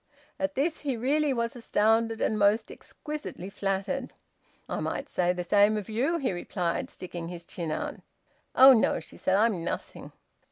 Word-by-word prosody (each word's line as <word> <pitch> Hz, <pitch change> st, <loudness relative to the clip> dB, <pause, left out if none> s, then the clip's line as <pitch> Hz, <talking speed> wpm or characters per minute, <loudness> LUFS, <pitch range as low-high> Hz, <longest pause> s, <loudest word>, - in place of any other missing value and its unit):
At 285 Hz, 0 st, -1 dB
this 305 Hz, +4 st, 0 dB
he 275 Hz, -5 st, -2 dB
really 285 Hz, +5 st, +1 dB
was 235 Hz, -2 st, -1 dB
astounded, 225 Hz, -1 st, +1 dB
and 220 Hz, -, +1 dB
most 205 Hz, +2 st, +3 dB
exquisitely 300 Hz, -, -7 dB
flattered. 200 Hz, +7 st, -2 dB, 0.6 s
"I -, -, -3 dB
might -, -, -3 dB
say 180 Hz, -1 st, +1 dB
the 180 Hz, 0 st, -3 dB
same 205 Hz, +4 st, +4 dB
of 210 Hz, -1 st, -5 dB
you," 265 Hz, +10 st, +1 dB
he 270 Hz, -8 st, -1 dB
replied, 175 Hz, -1 st, -2 dB
sticking 175 Hz, -2 st, -7 dB
his 170 Hz, -1 st, -7 dB
chin 170 Hz, -3 st, -5 dB
out. -, -, -3 dB, 0.6 s
"Oh 265 Hz, +1 st, +10 dB
no!" 225 Hz, -, +2 dB
she -, -, -12 dB
said. 185 Hz, -, +1 dB
"I'm 205 Hz, -4 st, +2 dB
nothing." -, -, -5 dB
220 Hz, 165 wpm, -28 LUFS, 185-265 Hz, 0.6 s, Oh